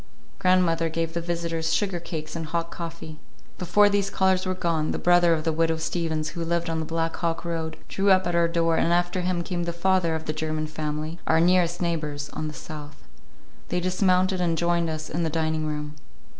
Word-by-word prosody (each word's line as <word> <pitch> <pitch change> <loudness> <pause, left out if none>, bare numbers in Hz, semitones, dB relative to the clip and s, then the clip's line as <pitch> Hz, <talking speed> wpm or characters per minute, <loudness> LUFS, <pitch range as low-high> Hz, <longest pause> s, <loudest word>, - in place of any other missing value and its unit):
Grandmother 175 -3 +3
gave 165 0 -2
the 170 - -2
visitors 165 -1 -2
sugar 190 -4 0
cakes 155 -2 -6
and 165 -1 -4
hot 170 +1 -2
coffee. 165 -2 -7 0.4
Before 185 +4 +4
these 200 -1 +1
callers 190 -1 +2
were 185 - 0
gone, 165 -4 0
the - - -2
brother 175 -1 +4
of 155 - -3
the 160 0 0
Widow 165 +1 +2
Steavens, 160 -1 -2
who 170 +1 -4
lived 170 0 -1
on 160 - -1
the 160 - -3
Black 165 0 -1
Hawk 165 0 -2
road, 160 -2 -3
drew 195 +1 +1
up 190 -1 +5
at 175 - -1
our 170 0 +3
door, 165 -1 +1
and 170 - +2
after 175 +1 +1
him 180 -1 -1
came 175 0 -3
the 170 - -1
father 170 -1 +1
of 160 - -5
the 155 - -2
German 155 0 -2
family, 155 +1 -4
our 160 - +4
nearest 175 0 +3
neighbors 150 -4 -2
on 155 - -4
the 150 - -6
south. 150 -1 -9 0.6
They 180 - 0
dismounted 185 +1 +2
and 170 -2 +1
joined 170 0 +1
us 155 0 -4
in 170 - -2
the 165 - 0
dining 160 -1 -1
room. 150 -1 -4
165 Hz, 210 wpm, -25 LUFS, 160-175 Hz, 0.6 s, up